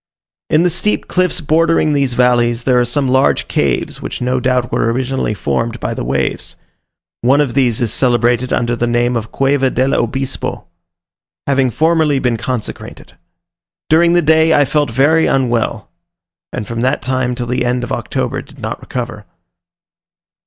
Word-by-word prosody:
In 155 +2 +3
the 180 - +2
steep 210 +6 -1
cliffs 180 -2 0
bordering 160 0 +2
these 135 -4 0
valleys, 120 -1 +2
there 125 -1 +3
are 120 - +2
some 135 +3 0
large 130 +1 +2
caves, - - -1
which - - -5
no 125 +1 0
doubt 125 -1 0
were 115 - +1
originally 130 -2 -2
formed 115 +3 -2
by - - -3
the - - -4
waves: - - -2 0.7
one 130 +4 +3
of 140 -5 +1
these 125 -4 +1
is 115 -3 0
celebrated 120 0 +1
under 120 0 0
the 120 0 -1
name 120 +1 +1
of 110 -1 -4
Cueva 135 -1 +1
del 130 +1 0
Obispo; 130 -1 -2 0.8
having 135 -2 +2
formerly 160 +1 +2
been 125 -3 0
consecrated. 125 0 -6 0.8
During 170 +2 +5
the 175 0 +3
day 160 +1 +4
I 145 - +4
felt 145 0 0
very 145 +7 +3
unwell, 120 -4 -1 0.6
and 110 -4 -5
from 115 0 -4
that 130 +1 0
time 130 -1 -1
till 120 - -3
the 125 +1 -1
end 125 0 -1
of 120 - -6
October - - -2
did - - -17
not - - -5
recover. 115 -5 -6
125 Hz, 165 wpm, -16 LUFS, 120-140 Hz, 0.8 s, During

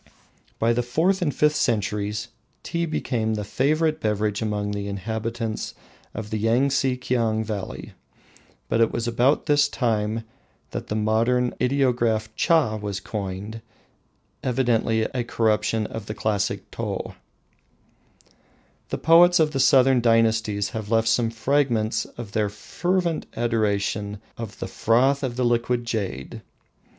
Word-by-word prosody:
By 115 +1 +2
the 120 - +1
fourth 165 +11 +1
and 160 -5 +1
fifth 150 +2 +2
centuries 105 -4 -1 0.3
Tea 170 0 -2
became 110 -8 -1
a 105 - -3
favourite 155 +8 +1
beverage 105 -1 0
among 105 -2 -1
the 100 0 -3
inhabitants 110 +3 -4 0.4
of 105 0 -6
the 110 - -1
Yangtse 130 +2 +2
Kiang 115 -4 0
valley. 105 -3 -6 0.8
It 115 0 +3
was 115 - -2
about 120 +5 +2
this 145 -2 +3
time 110 -2 -1 0.5
that - - -5
modern 115 +4 +1
ideograph 120 -5 +1
Cha 160 -11 +2
was 100 -2 -4
coined, 100 +2 -5 0.8
evidently 120 -3 +1
a 125 +2 -2
corruption 110 -1 +1
of 110 -1 -7
the 105 - -5
classic 105 -3 -1
Tou. - - -4 1.8
The - - -2
poets 175 +2 +6
of 155 -1 +3
the 135 - -2
southern 130 -1 +5
dynasties 110 -3 +2
have 110 -2 -6
left 115 0 +2
some 115 0 +2
fragments 115 -1 +1
of 115 -4 -9
their 105 -1 0
fervent 170 - -2
adoration 105 -3 0 0.2
of 115 -3 -7
the - - -4
"froth 130 +5 +2
of 130 -3 -2
the 125 0 0
liquid 120 0 +1
jade." 100 - -4
115 Hz, 130 wpm, -24 LUFS, 105-130 Hz, 1.8 s, poets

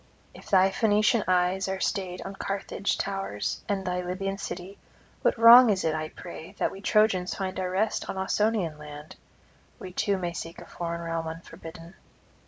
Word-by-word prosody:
If - - -13
thy 190 0 +5
Phoenician 215 +1 +3
eyes 185 +1 +2
are 190 0 -2
stayed 185 -2 -2
on 195 - -6
Carthage 195 0 -2
towers 195 - -3
and 195 -2 -1
thy 180 0 -1
Libyan 195 +2 -3
city, 185 +2 -7 0.4
what - - +2
wrong 235 +2 +9
is 195 -3 +1
it, 160 - +1
I 155 0 -3
pray, 175 +1 -10
that - - 0
we 195 - -10
Trojans 200 -4 +2
find 190 -1 -3
our 185 -1 -1
rest 200 +4 -1
on - - -4
Ausonian 190 -4 0
land? 150 +3 -10 0.6
We 185 - -9
too 200 0 +1
may 175 -2 -3
seek 165 0 -7
a - - -10
foreign 170 -1 -5
realm 165 -1 -3
unforbidden. 165 +1 -9
185 Hz, 175 wpm, -27 LUFS, 170-195 Hz, 0.6 s, wrong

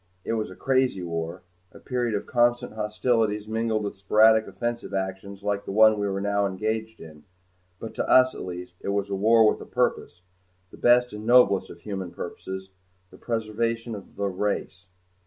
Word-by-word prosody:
It - - -1
was 110 -1 -2
a 95 - -11
crazy 130 -7 +1
war 85 +1 -4 0.3
a - - -14
period 120 -4 -2
of 100 - -3
constant 120 -1 +1
hostilities 105 0 0
mingled 110 -1 -1
with 100 -1 -5
sporadic 110 +2 +4
offensive 120 -3 -4
actions 95 +1 -5
like 100 -1 -1
the - - -6
one 110 +1 +5
we 100 - 0
were 95 0 -2
now 100 0 +1
engaged 110 +3 -3
in 75 -2 -13 0.6
but 110 -1 -7
to - - -3
us, 130 0 +6
at - - -8
least, 90 0 -7
it - - -4
was 100 0 -1
war 110 +3 +5
with - - +1
a - - -8
purpose 90 0 -1 0.5
the - - -13
best 125 0 +4
and 105 +1 -7
noblest 120 -6 +5
of - - -12
human 95 -3 -5
purposes 95 +2 -7 0.4
the - - -14
preservation 115 +1 -2
of 100 -3 -10
the 100 - -2
race. 95 -1 -3
105 Hz, 180 wpm, -25 LUFS, 95-115 Hz, 0.6 s, us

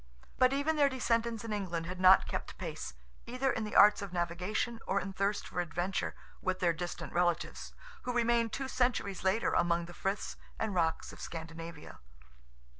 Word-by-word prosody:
But 255 0 +6
even 285 +3 +1
their 285 -1 +5
descendants 235 -3 0
in 220 - -3
England 175 -5 -2
had 185 +1 -5
not 185 +1 +7
kept - - -4
pace, - - -5 0.3
either 255 +2 0
in 225 -3 -2
the 210 - -6
arts 205 0 +7
of 200 -2 -5
navigation 180 +7 -1
or 195 - +2
in 195 0 -5
thirst 200 +2 0
for 180 - -2
adventure, 175 +2 -2 0.3
with 185 0 0
their 175 -2 +2
distant 175 +1 -5
relatives, 175 -1 0 0.3
who 250 - -3
remained 235 -1 +2
two 270 +2 -3
centuries 245 -8 0
later 190 +4 +2
among 170 0 +2
the 175 - -10
friths 195 +3 -3 0.2
and 220 -2 -1
rocks 165 -3 0
of - - -11
Scandinavia. 165 0 -7
195 Hz, 175 wpm, -32 LUFS, 175-235 Hz, 0.3 s, not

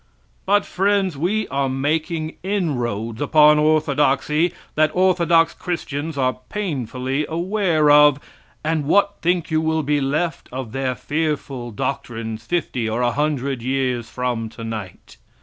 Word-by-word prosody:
But, 205 +1 +3
friends, 195 -2 +1
we 190 +8 -1
are 135 -1 0
making 155 +4 -2
inroads 125 - -2
upon 150 +1 +5
orthodoxy 150 +1 +2 0.2
that 155 0 +3
orthodox 170 -3 +3
Christians 160 -3 -4
are 130 -1 0
painfully 135 - -2
aware 170 -3 +2
of, 145 -1 +6 0.4
and 155 -1 0
what 200 +6 +2
think 175 -1 0
you 155 0 +2
will 160 0 0
be 145 0 +1
left 150 +4 -2
of 125 -3 -5
their 130 0 -2
fearful 145 -3 -3
doctrines 115 -1 -4
fifty 130 -9 -1
or 115 +3 -1
a 120 - +2
hundred 140 -2 -1
years 125 -2 -1
from 120 -3 -2
tonight? 110 -5 -8
150 Hz, 130 wpm, -21 LUFS, 130-165 Hz, 0.4 s, of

